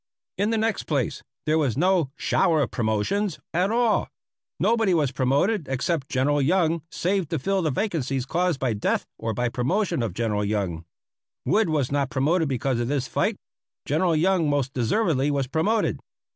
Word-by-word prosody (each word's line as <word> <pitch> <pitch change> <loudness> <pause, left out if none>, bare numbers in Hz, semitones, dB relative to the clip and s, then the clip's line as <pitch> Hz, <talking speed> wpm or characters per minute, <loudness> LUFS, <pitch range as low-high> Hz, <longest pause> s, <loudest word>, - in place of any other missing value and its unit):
In 205 +2 +2
the 225 - +1
next 220 -1 0
place, 140 -5 -1 0.2
there 155 +1 +2
was 135 -6 0
no 180 -3 +2
"shower 165 -6 +2
of 120 - -4
promotions" 120 - 0 0.2
at 180 +4 +2
all. 230 -1 +2 0.5
Nobody 225 -6 +2
was 145 -5 +1
promoted 140 - +1
except 135 +2 -1
General 140 +2 +1
Young, 165 +2 +2
save 185 0 -1
to 165 - -1
fill 195 +7 0
the 160 - +1
vacancies 135 - -1
caused 175 0 0
by 130 -4 0
death 105 - -1
or 115 -1 -2
by 125 - 0
the 120 - -1
promotion 170 - 0
of 110 -6 -3
General 105 -2 0
Young. 95 -6 -2 0.6
Wood 215 -4 +2
was 145 -5 0
not 140 -2 0
promoted 150 +5 +1
because 130 -1 -1
of 120 - -1
this 135 -1 -1
fight. - - 0 0.5
General 165 +3 +1
Young 170 -1 +2
most 140 -2 0
deservedly 135 - +1
was 140 -2 0
promoted. 165 - 0
145 Hz, 170 wpm, -25 LUFS, 130-185 Hz, 0.6 s, In